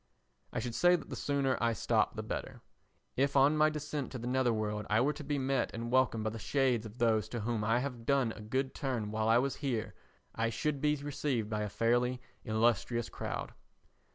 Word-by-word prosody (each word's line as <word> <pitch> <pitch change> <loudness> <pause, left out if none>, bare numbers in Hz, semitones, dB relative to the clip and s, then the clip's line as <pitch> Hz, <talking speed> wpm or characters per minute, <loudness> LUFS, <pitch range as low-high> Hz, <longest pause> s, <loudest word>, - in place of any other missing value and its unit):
I - - -5
should 120 0 -2
say 175 +6 +5
that 165 - -6
the - - -3
sooner 140 -2 0
I 115 -1 +2
stop 105 - +1
the - - -4
better. - - -5 0.5
If 140 +1 +2
on 140 +3 +5
my 155 0 +5
descent 150 -2 -4
to - - -3
the 120 - -6
nether 125 0 +2
world 105 -1 -2
I 110 - +4
were 145 +4 +2
to 150 - -8
be 145 0 -1
met 135 -1 0
and 115 +1 -4
welcomed 130 -4 +3
by 110 - -1
the 115 - -6
shades 125 -3 +1
of 110 +3 -14
those 110 -3 +2
to 120 -1 -4
whom 115 0 -1
I 115 +3 +2
have 125 -4 -5
done 135 -5 +3
a 105 - -9
good 130 +5 -1
turn 120 -7 -2
while 110 0 0
I 115 - +6
was 135 +2 0
here, 125 -7 -2 0.4
I 115 0 0
should 140 +5 -2
be 150 0 +3
received 140 -6 -2
by 105 0 -1
a 105 - -2
fairly 120 +4 +1 0.2
illustrious 115 +1 +1
crowd. - - -5
120 Hz, 215 wpm, -32 LUFS, 115-140 Hz, 0.5 s, I